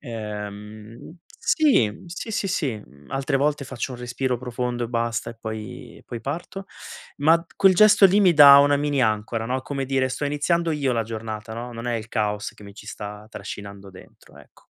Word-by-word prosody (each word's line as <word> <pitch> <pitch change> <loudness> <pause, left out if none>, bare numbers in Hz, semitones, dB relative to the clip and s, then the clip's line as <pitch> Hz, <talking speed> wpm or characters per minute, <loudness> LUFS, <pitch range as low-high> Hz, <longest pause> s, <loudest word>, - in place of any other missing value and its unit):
Ehm, 105 - -8 0.2
sì, 285 - +3
mhmm 110 - -14
sì, 175 +6 -7
sì, 205 -2 -1
sì, 140 -10 -1
mhmm, 70 0 -20
altre 135 +1 0
volte 145 +1 0
faccio 130 0 -5
un 120 - -8
respiro 125 0 -2
profondo 125 -1 -3
e - - -5
basta 115 -1 -2
e 115 - -13
poi 110 -1 -7
e - - -19
poi 120 -2 -6
parto. 170 +8 -5 0.5
Ma 160 +3 +5
q - - -22
quel 195 -1 +5
gesto 210 0 +7
lì 200 +3 +3
mi 185 -3 +5
dà 140 -2 +10
una 145 0 +4
mini 145 -2 0
ancora, 110 +1 -1
no, 130 +2 -1
come 135 -1 -4
dire: 130 0 0
"Sto 145 - -4
iniziando 165 +4 0
io 140 -4 0
la 115 -1 0
giornata," 110 -1 -6
no, 120 +1 -6
"Non 115 +1 -7
è 120 - 0
il 110 0 -7
caos 105 -1 -1
che 105 - -15
mi 100 - -11
ci - - -13
sta 105 +1 -8
trascinando 100 -1 -9
dentro," 95 - -17
ecco. - - -20
125 Hz, 205 wpm, -23 LUFS, 110-145 Hz, 0.5 s, dà